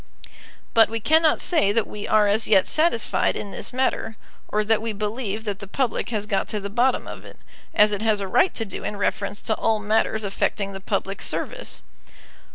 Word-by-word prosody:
But 225 -1 +6
we 225 0 -3
cannot 315 +6 +3
say 315 - +3
that 220 0 +1
we 210 -1 -7
are 215 -1 +4
as 210 +2 +2
yet 195 -3 +5
satisfied 310 -8 +2
in 200 - -5
this - - -6
matter, 250 -3 -1 0.3
or 215 0 0
that 220 +1 +2
we 225 -1 -3
believe 215 +1 -3
that 205 -3 -4
the 200 - -8
public 245 +3 -1
has 215 -3 -2
got 200 -2 -1
to 210 - -2
the 200 0 -6
bottom 245 +4 +2
of - - -9
it, - - -13 0.4
as 210 0 +5
it 205 0 -2
has 220 -2 +2
a 195 - -3
right 365 - +3
to 225 - -2
do 195 - -7
in 210 - -4
reference 200 0 -2
to 220 - +1
all 225 -1 +1
matters 215 +1 0
affecting 200 0 -2
the 195 - -7
public 195 0 -3
service. - - -3
215 Hz, 205 wpm, -23 LUFS, 200-230 Hz, 0.4 s, But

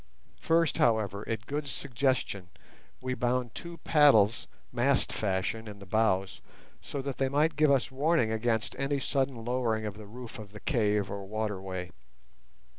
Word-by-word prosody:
First, 165 -2 +2
however, 105 -3 +2
at 110 -1 -2
Good's 145 0 -3
suggestion, 125 -8 -1 0.5
we 130 0 -1
bound 125 -1 0
two 170 0 -8
paddles 120 -9 +5 0.2
mast 125 +3 +2
fashion 105 +2 -1
in 105 -1 -8
the 100 - -11
bows 95 -2 +1 0.4
so 140 - -5
that 140 -1 -4
they 135 -1 +2
might 150 +3 +2
give 155 0 +4
us 135 -2 +2
warning 145 -3 +2
against 110 0 0
any 140 +1 0
sudden 135 -4 -1
lowering 120 -3 0
of 105 0 -5
the 105 - -10
roof 120 +1 -9
of 105 -2 -10
the 105 - -8
cave 105 -7 +1
or 100 0 -4
waterway. 95 -4 -3
115 Hz, 155 wpm, -30 LUFS, 105-135 Hz, 0.5 s, paddles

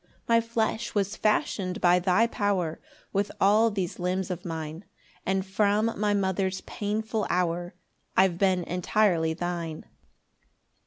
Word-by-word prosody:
2 - - -34 0.2
My 230 0 +5
flesh 230 0 -2
was 200 0 0
fashion'd 195 -3 0
by 175 0 +5
thy 185 +5 +3
power, 195 -8 -1 0.3
With 200 0 0
all 215 +4 +5
these 190 -5 -3
limbs 185 +1 -1
of 180 -1 -5
mine; 160 +1 -5 0.4
And 190 0 +1
from 210 +3 +1
my 205 0 +1
mother's 190 -1 0
painful 215 +1 -2
hour 175 0 -1 0.4
I've 185 -2 +4
been 185 -2 +2
entirely 175 -2 +1
thine. 170 -2 -4
190 Hz, 130 wpm, -27 LUFS, 175-210 Hz, 0.4 s, My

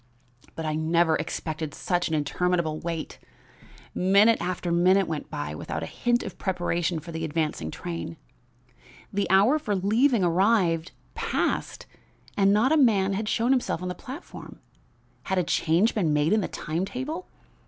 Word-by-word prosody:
"But 160 - -5
I 155 - -1
never 160 +1 +2
expected 155 -2 -4
such 175 -1 -1
an 160 - -1
interminable 155 +2 0
wait. 165 -2 -5 0.7
Minute 200 +5 +4
after 175 -1 -2
minute 185 +3 +4
went 155 -2 -4
by 75 0 -4
without 80 +1 -5
a - - -2
hint 240 - 0
of - - -8
preparation 175 -2 -1
for 170 +2 -10
the 160 0 -4
advancing 155 - -2
train. 85 +1 -6 1.0
The 200 0 0
hour 205 +11 +5
for 215 -9 -2
leaving 220 +4 +2
arrived, 175 -2 +2 0.2
passed, - - -2 0.5
and 200 -1 +4
not 220 +7 +3
a 315 - +4
man 200 -8 +3
had 210 +2 -2
shown 235 +3 +1
himself 250 -9 0
on 180 - -3
the - - -2
platform. 260 +8 -10 0.7
Had 190 - -1
a 180 - +3
change 170 +7 +2
been 170 -8 +1
made 150 +5 +2
in 215 - +3
the - - -2
time 165 +3 -3
table? 275 - -5
180 Hz, 160 wpm, -26 LUFS, 160-210 Hz, 1.0 s, hour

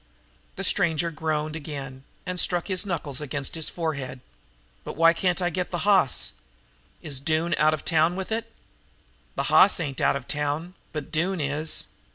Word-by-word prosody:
The - - -5
stranger 165 0 +2
groaned 155 0 -2
again 135 -3 -7 0.2
and 180 0 -2
struck 175 +2 +1
his 190 +2 +1
knuckles 150 -6 -2
against 140 -1 -3
his 160 -2 0
forehead. 140 -6 -4 0.6
"But - - -7
why 165 +1 +5
can't 180 +1 0
I 175 - 0
get 180 +2 -2
the 175 0 -3
hoss? 190 - +3 0.7
Is 140 -4 0
Doone 160 +4 +1
out 155 +1 +4
of - - -11
town 165 +1 +3
with 190 +2 -5
it?" 230 +1 -2 0.8
"The - - -1
hoss 195 - +5
ain't 140 -5 -4
out - - +3
of 140 -2 -6
town, 150 +4 -2 0.2
but 150 -2 -6
Doone 175 +3 0
is." 150 +2 +1
160 Hz, 170 wpm, -25 LUFS, 145-175 Hz, 0.8 s, why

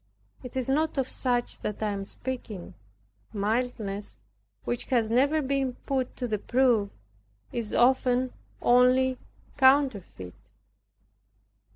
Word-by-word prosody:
It 250 +1 -8
is 255 - -1
not 300 +3 0
of 265 -2 +1
such 245 -2 0
that 210 +1 -4
I 210 - 0
am 195 -1 -4
speaking. 225 -5 -5 0.6
Mildness 210 -1 -2 0.5
which 120 0 -2
has 230 -4 +1
never 285 +6 +3
been 270 -1 0
put 260 -2 -1
to 250 - -2
the 215 -2 -1
proof, 240 -4 +2 0.6
is 230 -3 -3
often 255 0 +3 0.3
only 255 +1 +4 0.4
counterfeit. 260 - +2
250 Hz, 110 wpm, -27 LUFS, 215-260 Hz, 0.6 s, only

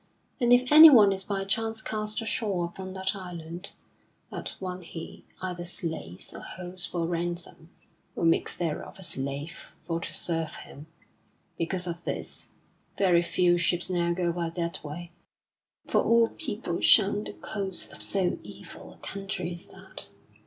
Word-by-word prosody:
And 240 -2 +3
if 250 +2 +5
anyone 290 -10 +10
is 190 0 -3
by 195 0 -2
chance 225 +2 -1
cast 215 0 -3
ashore 200 -5 0
upon 185 +2 -7
that 190 +2 -1
island, 175 -1 -7 0.6
that - - -5
one 185 -1 -5
he 165 -1 -9 0.2
either 180 -2 -3
slays 160 - -3
or - - -7
holds 180 0 -6
for 170 -2 -2
ransom, 170 -1 -4 0.5
or - - 0
makes 165 - +2
thereof 165 -3 -3
a 190 - -6
slave 140 +2 -1 0.2
for 165 -1 -1
to - - -5
serve 165 -2 -1
him. 150 +3 -11 0.7
Because 180 +2 -1
of 170 -1 -5
this, - - -3 0.5
very 180 -4 +5
few 175 0 +3
ships 175 +1 +1
now 170 -1 +1
go 170 0 +1
by 170 -1 -2
that 170 0 -3
way, 165 +3 -7 0.8
for - - +3
all 230 0 +5
people 210 - -4
shun 205 0 +5
the - - -7
coasts 195 -3 -5
of - - -10
so 190 -3 +1
evil - - -11
a - - -20
country 190 -3 -4
as 170 - -8
that. - - -10
180 Hz, 155 wpm, -28 LUFS, 170-195 Hz, 0.8 s, anyone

